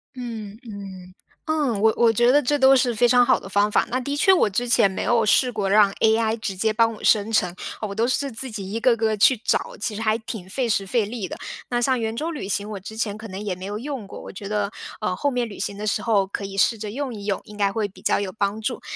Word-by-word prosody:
嗯 225 -4 -7
嗯， 190 -3 -9 0.3
嗯， 290 -10 0
我 220 +1 +5
我 230 -1 +4
觉 240 +3 +4
得 290 - +5
这 290 +1 0
都 265 0 +7
是 255 -2 +2
非 240 +2 +3
常 245 0 +5
好 255 0 +3
的 190 - -10
方 205 +2 +2
法， - - +2
那 255 +1 0
的 280 +3 -3
确 385 +6 +4
我 370 -11 +4
之 235 +5 -2
前 225 -4 +4
没 190 - -4
有 230 -2 +2
试 250 +4 +3
过 210 -4 -2
让 205 0 +5
AI 220 0 +3
直 200 -3 -4
接 220 +4 +1
帮 230 +1 +2
我 215 - -12
生 215 0 +3
成， 180 -5 +1 0.3
我 205 -2 -4
都 230 +3 +1
是 275 +2 -1
自 250 +2 -4
己 195 -3 -6
一 225 - -2
个 245 0 +4
个 220 -1 0
去 255 +6 +5
找， 220 - -1
其 220 0 -3
实 215 - -5
还 215 -1 +2
挺 220 -5 -7
费 240 +5 -2
时 200 -2 +1
费 220 +2 +1
力 210 -2 -5
的。 - - -6 0.4
那 240 0 +1
像 255 0 +2
圆 225 0 -2
周 320 +7 -2
旅 295 -11 -5
行， 205 +1 -2
我 205 -2 -5
之 210 +3 -9
前 215 -2 -2
可 220 +1 -9
能 190 +1 -6
也 195 -3 -2
没 185 +1 -8
有 205 +2 -4
用 265 -3 -5
过， 195 - -10
我 - - -9
觉 200 +1 -8
得， 205 -1 -1 0.3
呃， 210 -4 -1
后 285 +8 0
面 245 -3 -1
旅 200 - -10
行 200 - -3
的 215 - -3
时 210 - 0
候 205 -5 +2
可 200 +1 -5
以 195 0 -7
试 225 +4 +3
着 210 -1 -6
用 270 +2 -4
一 200 -1 -8
用， 200 -2 -1
应 210 - -12
该 200 -1 +2
会 210 0 -1
比 195 - -18
较 - - +2
有 200 -2 -3
帮 200 +2 -1
助。 245 +3 -3
220 Hz, 305 characters per minute, -23 LUFS, 200-240 Hz, 0.4 s, 都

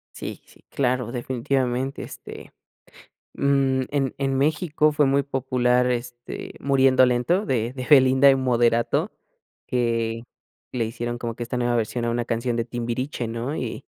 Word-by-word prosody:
Sí, - - -7
sí, - - -22
claro 125 -3 -1
definitivamente, 130 +1 -2
este, - - -10 0.8
mm, 135 -1 +2
en 140 -2 -1
en 135 -1 0
México 155 +1 +2
fue 150 0 +3
muy 140 0 +2
popular, 125 -2 +1
este, 120 0 -5
Muriendo 135 -2 +4
Lento 125 - +1
de 120 - -1
de 130 -1 -6
Belinda 135 -1 +7
y 135 - +4
Moderato, 120 -2 +1 0.6
que 115 -2 -1 0.5
le 120 -2 0
hicieron 120 +1 -4
como 115 -1 -4
que 120 - -5
esta 120 +2 -4
nueva 120 -1 +1
versión 115 +1 -1
a 120 - 0
una 120 0 -1
canción 115 +1 -1
de 115 - 0
Timbiriche, 120 +2 -3
¿no?, 115 +5 -3
y - - -5
125 Hz, 150 wpm, -24 LUFS, 120-135 Hz, 0.8 s, Belinda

